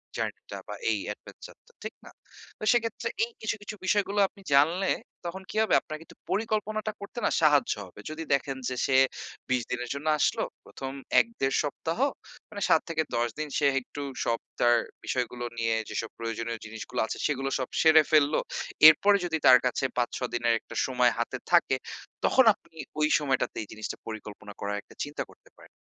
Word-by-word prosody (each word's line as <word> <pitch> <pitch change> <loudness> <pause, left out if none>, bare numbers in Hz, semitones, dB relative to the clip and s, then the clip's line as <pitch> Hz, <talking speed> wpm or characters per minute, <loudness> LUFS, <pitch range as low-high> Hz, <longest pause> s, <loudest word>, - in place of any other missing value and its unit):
Journey - - -3
টা - - -4
বা - - -5 0.2
এই - - +1 0.2
এডভেঞ্চার - - -13
টা, 475 - -23
ঠিক - - -5
না? - - -12 0.5
তো - - -8
সেক্ষেত্রে 230 -1 0 0.2
এই 235 - -2
কিছু, 220 0 -1
কিছু, 210 +1 -7
বিষয়গুলো 205 +1 +1
আপনি 200 - -19
জানলে 165 +7 +4 0.4
তখন 180 +3 -4
কি - - -11
হবে? 220 - 0
আপনার 155 - -7
কিন্তু 165 - -15 0.2
পরিকল্পনাটা 215 0 -1
করতে 200 +4 -6
না - - +4
সাহায্য 150 -3 +4
হবে। 90 - -15
যদি 155 +1 -5
দেখেন 135 -1 0
যে 130 - -3
সে 130 - +3 0.5
২০ 130 -1 +2
দিনের 125 0 -3
জন্য 140 +2 -5
আসল, - - +2 0.3
প্রথম 135 0 -6 0.3
১ - - +4
১.৫ 135 0 +1
সপ্তাহ 160 +5 -3 0.5
মানে, 205 - -7
৭ 160 - +5
থেকে 160 -1 +1
১০ 120 0 +2
দিন 155 - -2
সে 145 - +2 0.2
একটু 145 +3 -8 0.2
সব 115 - +1 0.2
তার 120 0 +5 0.3
বিষয়গুলো 125 -1 -2
নিয়ে 115 -1 +1
যেসব 115 - -3
প্রয়োজনীয় 115 0 -3
জিনিসগুলো 110 0 -6
আছে, - - -5
সেগুলো 135 -2 -1
সব 130 - -2
সেরে 160 -1 +7
ফেলল। 150 -1 +5 0.5
এরপরে 200 +6 +6
যদি 165 -2 0
তার 125 -1 +9
কাছে 125 +1 0
৫, 120 -1 +2
৬ 125 - -3
দিনের 120 -1 +2
একটা - - -12
সময় 125 -2 +3
হাতে 120 - -2
থাকে, 170 -6 +5 0.5
তখন 260 - +5
আপনি 165 -5 -24 0.2
ওই 150 - +4
সময়টাতে 140 -3 -1
এই - - -12
জিনিসটা 110 0 -5
পরিকল্পনা 105 -2 -8
করার 100 0 -2
একটা - - -19
চিন্তা 145 +1 -4
করতে - - -22
পারেন। - - -17
145 Hz, 185 wpm, -28 LUFS, 120-175 Hz, 0.5 s, তার